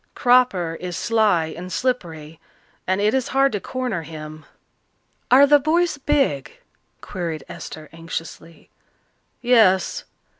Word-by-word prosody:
Cropper 245 -10 +2
is 180 -1 -5
sly 210 -9 +1
and 180 +2 -8
slippery, 165 -12 -3 0.5
and 190 +1 +1
it 210 +1 +2
is 265 -2 0
hard 270 +1 +2
to 205 - -2
corner 250 -6 -4
him." 155 -1 -10 0.8
"Are 265 +3 +7
the 290 +1 +5
boys 320 +2 0
big?" 265 - 0 0.5
queried 170 -4 -5
Esther 155 -1 -9
anxiously. 165 0 -8 0.7
"Yes. 220 -7 +3
190 Hz, 115 wpm, -21 LUFS, 165-255 Hz, 0.8 s, Are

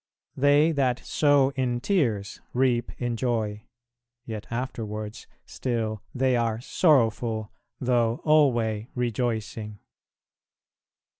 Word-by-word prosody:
"They 145 +4 +4
that 130 -5 0
sow 145 -2 +3
in 125 -3 -1
tears, 120 - 0
reap 125 -2 +2
in 120 -1 -1
joy;" 110 -3 -2 0.6
yet 110 -3 -6
afterwards 110 -3 -5 0.2
still 110 -4 -3
they 130 0 +2
are 115 -2 0
"sorrowful," 115 - +2 0.3
though 120 -2 +1
"alway 120 -8 +3
rejoicing." 110 -3 -2
120 Hz, 90 wpm, -26 LUFS, 110-130 Hz, 0.6 s, They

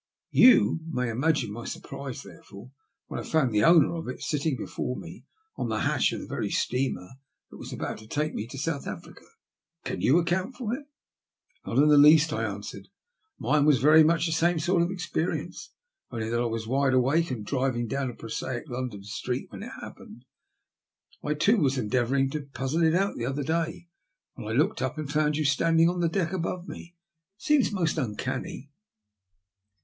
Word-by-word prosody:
You 250 -8 +6
may 125 -6 -1
imagine 140 -1 0
my 115 +3 -7
surprise, 135 -2 -7
therefore, 105 +5 -13 0.3
when - - -6
I - - -5
found 155 -6 +1
the 105 - +3
owner 165 -2 +6
of 165 -1 -5
it 130 - -5
sitting 150 -2 -1
before 125 +2 -4
me - - -10 0.3
on - - -2
the - - -1
hatch - - +2
of - - -4
the - - -7
very - - -3
steamer 125 -8 -1 0.4
that - - -11
was - - -9
to 110 - -6
take 150 +6 -2
me 105 - -4
to 135 - -9
South 140 +1 -3
Africa. 95 -4 -8 0.6
Can - - -3
you 140 - +4
account 185 +8 0
for 235 -3 -3
it?" 280 +3 -6 0.4
'< 380 0 -42
Not - - -2
in 145 +2 +6
the 145 -1 +7
least," 150 +1 +6
I 110 0 -1
answered. 100 -1 -6 0.5
Mine 150 -1 +2
was 150 -2 +5
very 155 +5 +6
much 165 +1 +2
the 165 - -1
same 165 +2 +2
sort 175 +2 +2
of 170 - +1
experience, 180 -2 -3 0.4
only 110 -1 -4
that 120 0 +1
I - - 0
was 115 -1 -3
wide 135 +2 +1
awake 145 +7 +2
and 115 -5 -4
driving 130 -1 -1
down 135 +3 -2
a 120 - -8
prosaic 120 +3 -5
London 120 -5 -5
street 105 - -4
when - - -8
it - - -7
happened. - - -11 1.0
I, 150 0 -1
too, 205 +10 +3
was 140 -7 +1
endeavouring 130 +4 +1
to 155 - -3
puzzle 140 +3 -3
it 160 0 +4
out 195 +2 0
the 120 - -2
other 140 +2 -2
day 165 +3 -2 0.5
when 115 -5 -8
I 110 +2 -1
looked 150 - +1
up 130 +3 -2
and 150 -2 -4
found 150 0 +2
you 155 - 0
standing 165 +3 +3
on 175 +1 -1
the 170 -1 +2
deck 175 -1 -1
above 180 0 -3
me. 170 +1 -10 0.4
It - - -19
seems 300 -4 +3
most 170 -5 0
uncanny." 130 +3 -4
145 Hz, 195 wpm, -27 LUFS, 125-165 Hz, 1.0 s, the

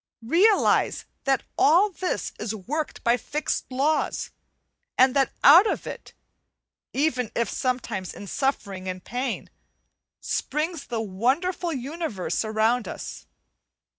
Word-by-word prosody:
Realize 370 - +3 0.2
that 270 -2 +2 0.2
all 360 +8 +5
this 370 0 -3
is 220 - -3
worked 285 +10 -4
by 235 +1 +3
fixed 300 +5 -2
laws, 285 +5 0 0.7
and 260 +1 +5
that 270 -2 +3
out 345 +9 +9
of - - -2
it - - -8 0.8
(even 255 -5 0
if 235 -1 +1
sometimes 245 -8 -2
in 205 - -9
suffering 200 -6 -2
and 185 -1 -5
pain) 250 +2 -3 0.7
springs 305 +2 -2
the 230 -2 -2
wonderful 265 - 0
universe 275 - -3
around 220 +2 +1
us. - - -7
260 Hz, 115 wpm, -25 LUFS, 225-315 Hz, 0.8 s, out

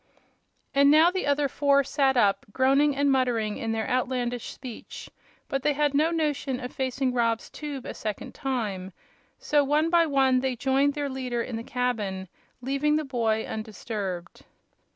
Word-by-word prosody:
And 280 +1 +5
now 315 +4 +6
the 375 -4 -2
other 285 0 +2
four 280 0 +3
sat 270 -1 +1
up, 200 -4 +2
groaning 275 +4 +3
and 285 0 +2
muttering 240 -5 +1
in 225 - -2
their 225 0 -2
outlandish 250 -2 -1
speech; 250 -4 -9 0.4
But 275 - -2
they 295 - +2
had 295 0 +1
no 305 +3 +3
notion 295 -5 -1
of 250 -1 -7
facing 260 0 -1
Rob's 230 -2 0
tube 290 -4 -6
a - - -5
second 215 -2 -5
time, 205 -8 -3 0.4
so 295 -1 +2
one 300 +4 +1
by 340 -1 +4
one 265 -3 +3
they 260 -1 -1
joined 275 +3 +1
their 290 -1 -2
leader 255 -3 -3
in 240 - -5
the 225 - -4
cabin, 210 -8 -2 0.3
leaving 275 +3 +1
the 310 0 0
boy 225 -4 0
undisturbed. 205 -4 -5
260 Hz, 165 wpm, -26 LUFS, 230-285 Hz, 0.4 s, now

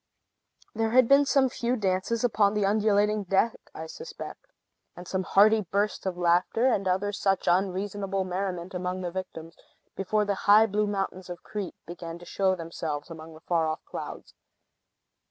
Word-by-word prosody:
There 225 0 0
had 250 +1 +5
been 280 +2 +6
some 275 -1 +4
few 245 0 -1
dances 200 +2 -1
upon 210 -4 +2
the 210 -1 +1
undulating 210 0 +2
deck, 195 +4 +2 0.2
I 160 - -6
suspect, 475 - -9 0.5
and 175 0 -10
some 190 - -1
hearty 215 +4 +4
bursts 200 +2 -1
of 180 -2 -3
laughter, 180 +7 +2
and 205 -7 +2
other 190 +3 +1
such 195 -1 0
unseasonable 195 +2 0
merriment 185 -1 -4
among 180 0 -3
the 175 -1 -3
victims, 165 -3 -7 0.4
before 210 +2 0
the 200 - 0 0.2
high 215 +2 +8
blue 210 0 0
mountains 195 -2 -3
of 175 -1 -8
Crete 205 -4 -5
began 170 -1 -7
to 175 - -13
show 190 +1 +1
themselves 165 -2 -5
among 160 0 -10
the 155 - -15
far 165 -2 +1
off 155 0 -4
clouds. - - -8
195 Hz, 165 wpm, -27 LUFS, 180-210 Hz, 0.5 s, high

